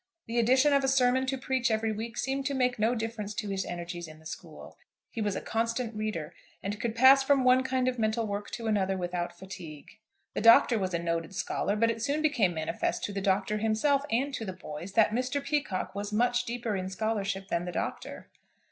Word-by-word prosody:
The 235 +1 -1
addition 260 +5 +4
of 280 -1 +3
a - - +2
sermon 260 0 +3
to 270 0 -1
preach 260 -2 0
every 220 0 +1
week 225 +2 -5
seemed 270 +2 -1
to 280 - -2
make 250 -2 +1
no 225 +3 +2
difference 220 -2 -4
to 210 - -3
his 195 -1 -1
energies 175 -1 -6
in 155 0 -12
the 160 - -19
school. - - -9 0.4
He 230 - -4
was 205 -2 0
a - - -3
constant 230 +1 -1
reader, 210 -7 -4 0.3
and 205 +1 -4
could 230 -1 -2
pass 260 +3 +7
from 270 -1 +3
one 255 0 +5
kind 260 -1 0
of 250 -1 -1
mental 220 +1 +1
work 205 0 -4
to 230 - -5
another 195 -3 +1
without 175 -1 -3
fatigue. 180 0 -10 0.3
The - - -2
Doctor 230 +1 +7
was 185 -2 -1
a - - +2
noted 170 +2 -2
scholar, 205 - -1
but 230 +2 +3
it 225 0 -6
soon 290 +6 0
became 230 - +2
manifest 160 0 -2
to 205 - -3
the 195 - -2
Doctor 200 +2 +1
himself, 225 +6 +2
and 270 +5 0
to 230 - -3
the 190 -4 -4
boys, 175 +1 -8
that 220 -1 +4
Mr. 255 +4 -1
Peacocke 280 -10 -2
was 205 +1 -4
much 245 +3 +2
deeper 235 -2 -3
in 185 -1 -3
scholarship 200 -1 -2
than 170 +1 -1
the 180 - -4
Doctor. - - -5
220 Hz, 220 wpm, -29 LUFS, 195-250 Hz, 0.4 s, pass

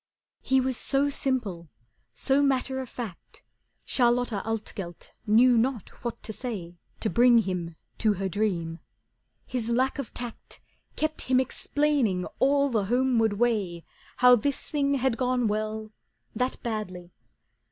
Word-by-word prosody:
He 265 0 +3
was 260 -1 0
so 280 +1 +1
simple, 215 - -1 0.4
so 275 +1 +2
matter 265 -1 +1
of 260 -2 -5
fact, 220 -8 -8 0.4
Charlotta 240 -4 +2
Altgelt 205 -6 -5
knew 235 +3 +6
not 240 -3 -1
what 235 -1 -5
to 220 - -5
say 185 -9 -6 0.2
To 220 - +2
bring 240 0 +6
him 180 -6 -1 0.2
to 215 -2 +3
her 195 0 -2
dream. 175 -5 -1 0.7
His 235 -3 -3
lack 260 +4 +1
of 275 - -5
tact 240 -2 -8 0.4
Kept 310 0 -1
him 255 -1 +5
explaining 260 -8 0
all 280 +1 +3
the 220 -5 0
homeward 240 -1 +2
way 205 -7 0 0.3
How 250 0 +7
this 275 +4 -2
thing 280 -2 +1
had 260 -3 +1
gone 250 -1 +1
well, 215 +1 -3 0.4
that 250 +3 -2
badly. 185 -6 -4
235 Hz, 135 wpm, -27 LUFS, 205-260 Hz, 0.7 s, How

